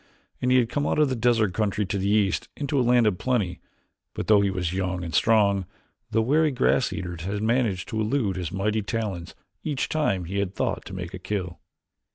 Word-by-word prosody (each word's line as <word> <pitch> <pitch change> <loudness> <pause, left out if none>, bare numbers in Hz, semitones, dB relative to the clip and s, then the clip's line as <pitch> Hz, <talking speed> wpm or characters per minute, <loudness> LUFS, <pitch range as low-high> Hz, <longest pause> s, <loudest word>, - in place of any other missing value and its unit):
He 125 0 +2
had 125 -2 +4
come 145 +5 -1
out - - 0
of 150 -2 +4
the 130 - 0
desert 115 -4 +2
country 105 0 0
to 100 +1 -2
the 100 +1 0
east 105 -2 +1
into 140 -1 0
a - - +4
land 120 -1 +4
of 100 -4 +1
plenty 105 -9 0 0.6
but - - -3
though 105 -2 +5
he 100 - +2
was 90 -3 -2
young 90 -1 -2
and 85 -2 -6
strong, 100 -2 +3 0.4
the 110 0 +2
wary 155 +6 +3
grass 130 -1 +2
eaters 90 -2 -5
had 100 +4 -3
managed 110 -5 +1
to 110 -2 -1
elude 110 -3 0
his 90 -3 -4
mighty 105 +3 0
talons 100 -5 -4 0.3
each 145 -4 -2
time 100 - 0
he 95 +4 -3
had 100 -1 -2
thought - - -2
to 95 - -8
make 90 -1 -6
a 95 - -6
kill. 90 -3 -4
105 Hz, 210 wpm, -25 LUFS, 95-120 Hz, 0.6 s, though